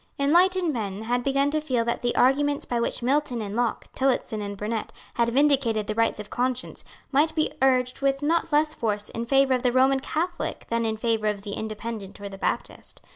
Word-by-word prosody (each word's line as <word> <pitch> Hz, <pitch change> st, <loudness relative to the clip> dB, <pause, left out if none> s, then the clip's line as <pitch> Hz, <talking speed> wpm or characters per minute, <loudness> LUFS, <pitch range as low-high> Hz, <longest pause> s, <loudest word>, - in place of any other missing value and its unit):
Enlightened 345 Hz, +4 st, +3 dB
men 210 Hz, -3 st, -4 dB
had 245 Hz, +2 st, 0 dB
begun 275 Hz, +1 st, +2 dB
to 310 Hz, 0 st, 0 dB
feel 250 Hz, -6 st, 0 dB
that 235 Hz, -, -1 dB
the 245 Hz, -, 0 dB
arguments 285 Hz, +3 st, +2 dB
by 240 Hz, -, -1 dB
which 235 Hz, -, -2 dB
Milton 265 Hz, -1 st, +1 dB
and 205 Hz, -1 st, -4 dB
Locke, 240 Hz, -1 st, -1 dB
Tillotson 255 Hz, -5 st, 0 dB
and 200 Hz, -1 st, -5 dB
Burnet, 215 Hz, +2 st, -3 dB, 0.2 s
had 235 Hz, 0 st, +1 dB
vindicated 260 Hz, -5 st, +2 dB
the 215 Hz, -, -2 dB
rights 230 Hz, 0 st, +1 dB
of 210 Hz, 0 st, -8 dB
conscience 255 Hz, 0 st, -2 dB, 0.3 s
might 305 Hz, +3 st, +2 dB
be 310 Hz, -, +1 dB
urged 255 Hz, -1 st, +2 dB
with 275 Hz, +1 st, +1 dB
not 330 Hz, +2 st, +1 dB
less 300 Hz, +1 st, +2 dB
force 210 Hz, -6 st, -2 dB
in 230 Hz, +1 st, -4 dB
favour 270 Hz, +1 st, +3 dB
of 250 Hz, -, +1 dB
the 250 Hz, -, +2 dB
Roman 265 Hz, +2 st, +4 dB
Catholic 345 Hz, +6 st, -3 dB
than 230 Hz, 0 st, 0 dB
in 220 Hz, 0 st, -2 dB
favour 220 Hz, -1 st, 0 dB
of 205 Hz, -1 st, -2 dB
the 205 Hz, -, -6 dB
Independent 215 Hz, -2 st, -6 dB
or 200 Hz, 0 st, -6 dB
the 195 Hz, -1 st, -10 dB
Baptist. -, -, -3 dB
245 Hz, 205 wpm, -25 LUFS, 220-280 Hz, 0.3 s, Roman